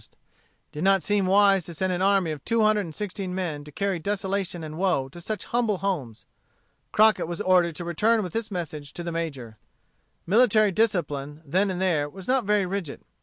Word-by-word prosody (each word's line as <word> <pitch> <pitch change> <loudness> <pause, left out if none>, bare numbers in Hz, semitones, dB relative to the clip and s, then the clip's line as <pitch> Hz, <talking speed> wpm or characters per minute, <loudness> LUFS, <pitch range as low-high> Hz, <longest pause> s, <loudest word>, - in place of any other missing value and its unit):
It - - -23 0.5
did 150 - -5
not 195 -1 +3
seem 205 -2 +1
wise 195 -2 +4
to 170 - -8
send 185 +3 0
an 180 - -2
army 195 -4 +3
of 150 -3 -7
two 230 -1 +1
hundred 215 0 +3
and 160 -2 -9
sixteen 195 -2 -4
men 165 -6 -3
to 150 - -11
carry 195 +1 -1
desolation 195 -2 -2
and 155 +1 -7
woe 175 -9 +1
to 175 +5 -11
such 215 +4 -4
humble 230 -4 0
homes. 160 - -3 0.7
Crockett 215 -4 +4
was 175 0 -5
ordered 180 -3 +3
to 175 - -6
return 215 +6 +2
with 180 -3 -6
this 225 -1 -2
message 155 -6 -5
to 175 - -6
the 170 - -4
Major. 135 -10 -5 0.7
Military 215 0 +4
discipline, 155 -8 -1
then 185 +8 +1
and 185 -1 -3
there, 160 -6 +1
was 190 +4 -11
not 255 -3 +2
very 205 -1 +2
rigid. 180 -5 -4
185 Hz, 200 wpm, -25 LUFS, 160-205 Hz, 0.7 s, wise